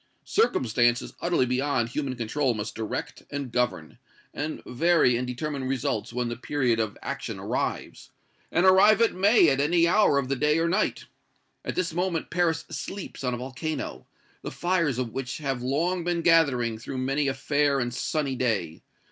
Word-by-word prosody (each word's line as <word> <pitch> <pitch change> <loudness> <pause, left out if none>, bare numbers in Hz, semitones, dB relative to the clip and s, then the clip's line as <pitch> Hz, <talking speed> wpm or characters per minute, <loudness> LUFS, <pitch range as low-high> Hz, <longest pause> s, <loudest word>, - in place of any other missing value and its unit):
Circumstances 120 - +1
utterly 170 -7 +2
beyond 125 -1 0
human 135 +1 -3
control 125 +2 -1
must 105 0 -4
direct 110 -1 -5
and 140 -3 -5
govern, 120 -7 -2 0.3
and 155 +2 -4
vary 140 -1 +3
and 125 +1 -2
determine 135 +2 -4
results 130 -5 -2
when 125 0 -2
the 120 - -3
period 125 -2 0
of 110 -2 -2
action - - -4
arrives; - - -3 0.4
and 175 - +2
arrive 195 +3 +6
it 230 - +3
may 200 0 +5
at 135 -1 +1
any 170 +3 +3
hour 185 -5 +4
of 140 -2 0
the 135 - 0
day 150 +4 +2
or 165 +1 +1
night. 190 +5 0 0.6
At - - -4
this 185 -2 -1
moment 175 -1 -2
Paris 165 -2 +1
sleeps 195 -7 -6
on 125 -1 0
a - - -5
volcano, 130 +5 -5 0.3
the - - -5
fires 170 -7 0
of 125 -3 -2
which 130 +1 -4
have 135 -5 -3
long 165 +8 0
been 170 -1 -1
gathering 135 -10 +3
through 130 +3 -6
many 135 +3 0
a 135 - 0
fair 145 +1 +1
and 120 -1 -2
sunny 140 0 -1
day! 105 -11 -1
140 Hz, 175 wpm, -26 LUFS, 125-165 Hz, 0.6 s, arrive